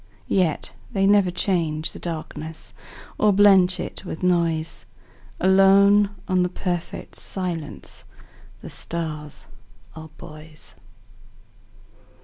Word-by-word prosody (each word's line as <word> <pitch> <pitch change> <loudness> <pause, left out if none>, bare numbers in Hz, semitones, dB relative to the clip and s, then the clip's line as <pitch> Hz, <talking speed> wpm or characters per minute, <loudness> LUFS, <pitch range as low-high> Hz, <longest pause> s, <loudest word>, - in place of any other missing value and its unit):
Yet 180 -6 0 0.2
they 195 -1 +1
never 200 -2 +5
change 170 -4 -1
the - - -10
darknessOr 160 -1 -6 0.6
blench 190 -3 +5
it - - -6
with 175 -2 -7
noise; 165 -3 0 0.5
Alone 195 +2 +5 0.2
on 185 -2 +2
the 180 - +1
perfect 175 -2 -4
silenceThe 175 -5 -8
stars 155 -3 -5 0.5
are 160 0 -9
buoys. 155 0 -11
175 Hz, 90 wpm, -23 LUFS, 160-190 Hz, 0.6 s, never